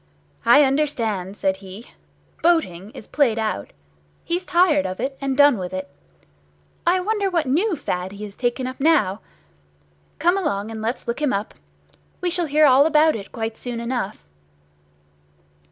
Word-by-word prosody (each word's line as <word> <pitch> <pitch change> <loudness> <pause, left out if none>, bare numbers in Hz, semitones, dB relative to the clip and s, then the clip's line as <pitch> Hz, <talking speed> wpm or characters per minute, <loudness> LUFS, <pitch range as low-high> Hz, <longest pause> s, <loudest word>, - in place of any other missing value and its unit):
"I 285 +5 +7
understand," 230 -9 -1
said 190 -1 0
he. 195 +4 -12 0.5
"Boating 210 - +1
is - - -9
played 255 -7 +1
out. 215 - -2 0.6
He's 350 +2 -2
tired 340 - +3
of 185 0 -6
it, 270 0 -2
and 270 -1 -2
done 285 -6 +5
with 180 0 -5
it. 185 0 -5 1.0
I 365 +2 +4
wonder 405 +1 0
what 340 -4 0
new 340 +10 +1
fad 185 - -4
he 205 +1 -8
has 205 -1 -8
taken 250 +1 -1
up 255 0 -6
now? 275 - +2 1.0
Come 350 +4 +2
along 205 - -2
and 220 -1 -6
let's 230 +3 -3
look 235 +5 -3
him 295 -3 +1
up. 200 +2 -3 0.7
We 360 -1 -1
shall 350 -1 +2
hear 305 +1 +4
all 275 +2 +6
about 310 0 +4
it 200 -3 -8
quite 225 -1 -4
soon 245 -2 -5
enough." 235 - -4
255 Hz, 160 wpm, -22 LUFS, 205-310 Hz, 1.0 s, I